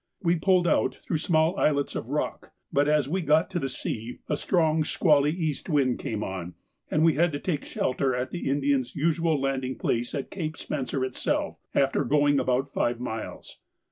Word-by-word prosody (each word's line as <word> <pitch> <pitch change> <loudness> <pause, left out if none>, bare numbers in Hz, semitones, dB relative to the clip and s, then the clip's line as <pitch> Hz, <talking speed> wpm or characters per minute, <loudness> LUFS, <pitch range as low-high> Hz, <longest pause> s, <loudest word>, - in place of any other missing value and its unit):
We 170 0 +3
pulled 180 +1 +3
out - - +2
through 160 - -1
small 160 +2 +2
islets 140 -2 +1
of - - -4
rock, - - -3 0.2
but 145 +1 +3
as 150 -3 +3
we 185 +6 -1
got 160 +3 +2
to 175 -8 -1
sea 120 -2 -5
a 150 - 0
strong 160 0 +2
squally 150 -2 +3
east 160 -1 -2
wind 135 -5 +2
came 110 -1 -3
on, 90 -2 -5 0.3
and 155 - +2
we 165 -1 +5
had 170 +3 +2
to 145 - -2
take 150 -5 -2
shelter 130 0 0
at 125 +1 -3
the 175 - -3
Indians' 140 -2 +1
usual 165 0 +1
landing 135 -1 -1
place 120 +1 -1
at 140 - -4
Cape 160 -5 -4
Spencer 135 -2 -2
itself, 130 - -2 0.2
after 140 +1 +2
going 145 +1 +3
about 130 +2 +1
five 120 -3 -1
miles. 115 -3 -6
145 Hz, 180 wpm, -27 LUFS, 130-160 Hz, 0.3 s, we